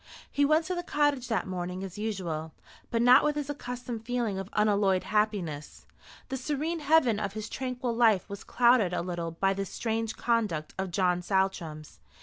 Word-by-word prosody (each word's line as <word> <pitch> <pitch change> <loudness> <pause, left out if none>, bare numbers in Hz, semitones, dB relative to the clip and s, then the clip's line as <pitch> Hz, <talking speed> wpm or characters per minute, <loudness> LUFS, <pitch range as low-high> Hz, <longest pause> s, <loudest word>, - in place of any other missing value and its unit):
He 285 - +3
went 310 +3 +3
to 370 - -2
the 350 - -2
cottage 290 -6 +1
that 225 -6 0
morning 180 0 -4
as 190 -2 -7
usual, 175 -7 -3 0.4
but 230 0 +1
not 245 +1 +7
with 300 0 +1
his 290 -1 -2
accustomed 245 -4 -6
feeling 235 -5 -1
of 195 0 -6
unalloyed 205 -3 +2
happiness. 200 -9 -2 0.4
The 265 - -2
serene 300 +5 -2
heaven 290 -7 +3
of 200 -2 -3
his 215 0 -5
tranquil 250 -2 -3
life 225 -6 +4
was 200 0 -8
clouded 235 -7 +3
a 180 - -1
little 175 -2 -3
by 195 +4 0
this 195 0 -4
strange 225 -1 -2
conduct 210 -10 0
of 190 -1 -1
John 180 0 +1
Saltram's. 175 -5 -2
215 Hz, 175 wpm, -29 LUFS, 185-250 Hz, 0.4 s, not